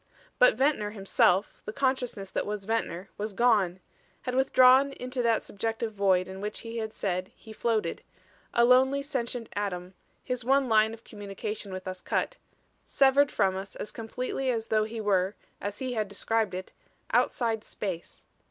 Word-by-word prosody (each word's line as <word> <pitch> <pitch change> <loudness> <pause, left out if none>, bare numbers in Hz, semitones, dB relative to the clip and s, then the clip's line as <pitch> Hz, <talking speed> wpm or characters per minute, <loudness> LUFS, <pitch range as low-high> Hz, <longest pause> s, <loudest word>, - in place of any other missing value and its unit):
But - - +6
Ventnor 265 -7 +1
himself, 195 -2 +2
the - - -4
consciousness 250 -6 -1
that - - -2
was 210 -1 -3
Ventnor 195 -4 -2
was 210 0 -3
gone; 200 -5 +3 0.4
had 250 - -3
withdrawn 265 +1 +5
into 255 0 -3
that 230 -2 +2
subjective 225 +2 -3
void 190 -3 +2
in 190 +1 -8
which 210 +1 -4
he 230 0 -6
had 220 -1 -3
said 185 -3 -2
he 220 - -12
floated 225 -1 -1 0.5
a 235 - +4
lonely 265 +3 +4
sentient 245 -4 -3
atom, 185 -3 -3 0.3
his 250 -1 -3
one 270 +2 +3
line 220 -1 +4
of 230 - -21
communication 205 0 -6
with 185 0 -6
us 185 0 -5
cut; - - -1 0.5
severed 280 +1 +4
from 195 -3 +2
us 195 +1 -6
as - - -5
completely 250 +3 -3
as 225 -3 -1
though 215 -1 +3
he 225 +1 -6
were, 195 -2 +1 0.3
as 205 0 -4
he 255 -1 -3
had 215 -3 -1
described 205 0 -1
it, 185 0 -7 0.4
outside 225 -3 +1
space. 185 -5 -6
220 Hz, 165 wpm, -28 LUFS, 200-250 Hz, 0.5 s, But